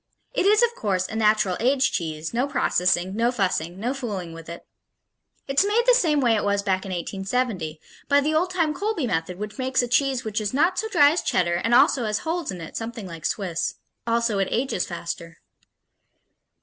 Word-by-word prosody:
It 380 Hz, -, +1 dB
is, 425 Hz, +3 st, +5 dB
of 475 Hz, 0 st, +2 dB
course, 190 Hz, -, -1 dB
a -, -, -7 dB
natural 215 Hz, -4 st, +2 dB
aged 260 Hz, +3 st, +2 dB
cheese, 160 Hz, 0 st, -3 dB
no 250 Hz, +4 st, +1 dB
processing, 185 Hz, -8 st, +1 dB
no 235 Hz, +2 st, +2 dB
fussing, 185 Hz, -6 st, -1 dB
no 240 Hz, +5 st, -1 dB
fooling 205 Hz, -11 st, -5 dB
with 165 Hz, 0 st, -10 dB
it. 170 Hz, -, -9 dB, 0.8 s
It's 275 Hz, +6 st, +3 dB
made 420 Hz, +4 st, +2 dB
the -, -, +6 dB
same 325 Hz, -11 st, +3 dB
way 240 Hz, -3 st, +3 dB
it 210 Hz, -, 0 dB
was 200 Hz, 0 st, +1 dB
back 190 Hz, -1 st, -1 dB
in -, -, -5 dB
1870, 190 Hz, -2 st, -2 dB, 0.3 s
by 285 Hz, 0 st, +5 dB
the 300 Hz, +2 st, 0 dB
old 340 Hz, +4 st, +2 dB
time 335 Hz, -4 st, 0 dB
Colby 395 Hz, -2 st, -2 dB
method 180 Hz, -3 st, -2 dB
which 210 Hz, +4 st, -7 dB
makes 260 Hz, -1 st, +1 dB
a -, -, -2 dB
cheese 260 Hz, +1 st, +1 dB
which 220 Hz, 0 st, -2 dB
is 210 Hz, +4 st, -2 dB
not 350 Hz, +6 st, +2 dB
so 440 Hz, -, -2 dB
dry 295 Hz, -9 st, +5 dB
as 335 Hz, -, 0 dB
Cheddar 175 Hz, -2 st, +1 dB
and 230 Hz, +1 st, +3 dB
also 270 Hz, -2 st, +4 dB
has 210 Hz, -1 st, 0 dB
holes 330 Hz, 0 st, -2 dB
in 180 Hz, -3 st, -5 dB
it, 165 Hz, -, -9 dB
something 225 Hz, -2 st, -5 dB
like 165 Hz, -3 st, -8 dB
Swiss. 180 Hz, -5 st, -2 dB, 0.3 s
Also, 230 Hz, -3 st, +1 dB
it 195 Hz, -, +1 dB
ages 240 Hz, -6 st, -1 dB
faster. 170 Hz, -1 st, -6 dB
225 Hz, 200 wpm, -24 LUFS, 185-280 Hz, 0.8 s, the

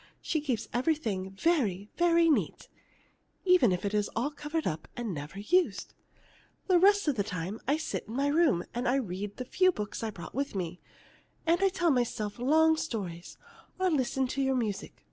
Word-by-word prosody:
She 315 Hz, -, -1 dB
keeps 250 Hz, -7 st, -2 dB
everything 240 Hz, -9 st, 0 dB
very, 205 Hz, -, 0 dB
very 340 Hz, -1 st, +4 dB
neat, 310 Hz, -, 0 dB, 0.8 s
even 360 Hz, -, +5 dB
if 180 Hz, +2 st, -1 dB
it 200 Hz, -, -1 dB
is 210 Hz, -1 st, +1 dB
all 255 Hz, +6 st, 0 dB
covered 295 Hz, +2 st, -3 dB
up 155 Hz, 0 st, -3 dB
and 235 Hz, -5 st, -3 dB
never 150 Hz, +4 st, -7 dB
used. 350 Hz, -, +1 dB, 0.7 s
The 365 Hz, -3 st, +4 dB
rest 405 Hz, 0 st, +5 dB
of 295 Hz, -, +3 dB
the 200 Hz, -, +2 dB
time 185 Hz, +2 st, -4 dB
I 285 Hz, +3 st, +3 dB
sit 315 Hz, 0 st, -4 dB
in 225 Hz, -, -7 dB
my 275 Hz, +2 st, +1 dB
room 285 Hz, -, +3 dB
and 245 Hz, +2 st, -2 dB, 0.2 s
read 195 Hz, +3 st, -5 dB
the 255 Hz, -, -4 dB
few 370 Hz, +8 st, +3 dB
books 210 Hz, -, -5 dB
I 225 Hz, -, -2 dB
brought 175 Hz, -5 st, -9 dB
with 275 Hz, -2 st, -2 dB
me, 180 Hz, -2 st, -4 dB, 0.6 s
and 335 Hz, +1 st, +3 dB
tell 350 Hz, -3 st, +2 dB
myself 240 Hz, -4 st, -1 dB
long 315 Hz, +5 st, +4 dB
stories, 185 Hz, -, -5 dB, 0.4 s
or 370 Hz, -1 st, +2 dB
listen 265 Hz, -2 st, +1 dB
to 275 Hz, -, -2 dB
your 265 Hz, 0 st, +1 dB
music. 215 Hz, -5 st, -3 dB
255 Hz, 180 wpm, -29 LUFS, 200-320 Hz, 0.8 s, even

